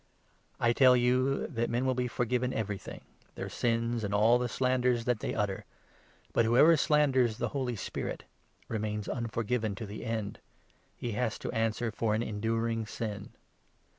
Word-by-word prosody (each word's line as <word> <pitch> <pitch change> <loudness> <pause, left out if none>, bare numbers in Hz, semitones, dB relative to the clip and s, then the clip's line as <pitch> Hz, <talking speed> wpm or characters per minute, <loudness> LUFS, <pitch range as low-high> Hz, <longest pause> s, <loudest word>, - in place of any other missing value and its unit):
I 120 0 +3
tell 130 0 +6
you 130 +3 +2
that - - -7 0.2
28 - - -7
men 120 +2 0
will 130 - +2
be 125 0 -1
forgiven 125 +1 -1
everything 105 -3 -4 0.2
— - - -33
their - - -5
sins, 115 -1 0
and 100 0 -1
all 115 +4 +5
the 125 0 -1
slanders 125 -1 +1
that 125 -3 +1
they - - -3
utter; 105 -3 -1 0.7
but 115 - +3
whpever 140 +8 +6
slanders 130 -7 +3
the - - -1
Holy 130 -4 -2
Spirit 100 - -4 0.4
remains 105 -1 -3
29 120 - -3
unforgiven 115 -1 -1
to 110 - -6
the 105 +1 -7
end; 110 -3 -3 0.6
he 120 - -3
has 110 +1 -1
to - - -5
answer 115 0 0
for 110 0 0
an 110 - 0
enduring 115 +1 -1
sin." 105 -3 -5
115 Hz, 170 wpm, -30 LUFS, 110-125 Hz, 0.7 s, tell